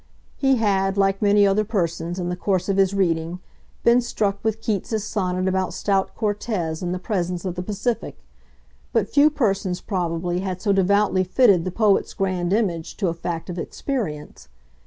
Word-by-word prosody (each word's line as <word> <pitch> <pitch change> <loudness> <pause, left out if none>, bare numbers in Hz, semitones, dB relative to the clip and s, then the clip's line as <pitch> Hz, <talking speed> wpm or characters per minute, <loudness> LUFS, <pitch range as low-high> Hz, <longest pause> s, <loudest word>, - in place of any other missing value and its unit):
He 270 -1 +3
had, 195 -4 +1
like 195 0 +2
many 205 0 +5
other 200 +2 +3
persons, 175 -5 -2
in 175 -1 -2
the 180 - -2
course 185 0 -1
of 195 -1 0
his 195 -1 +4
reading, 170 -2 0 0.4
been 235 +1 +5
struck 200 -4 -2
with 220 0 0
Keats's 215 0 -2
sonnet 185 -3 -1
about 190 0 0
stout 195 -2 0
Cortez 205 -7 -2
in 175 -1 -2
the 180 - -1
presence 180 -2 -2
of 185 - -2
the 180 - -4
Pacific; 210 +5 -3 0.8
but - - +2
few 295 +1 +5
persons, 200 -10 0
probably, 175 -2 -2
had 185 -1 -3
so 200 +1 +1
devoutly 195 0 +3
fitted 185 -2 +4
the 185 - -2
poet's 210 0 +2
grand 185 -2 -1
image 185 -7 -1
to 195 -4 0
a - - -1
fact 165 0 -5
of 180 -1 -5
experience. 170 - -4
195 Hz, 175 wpm, -23 LUFS, 180-210 Hz, 0.8 s, many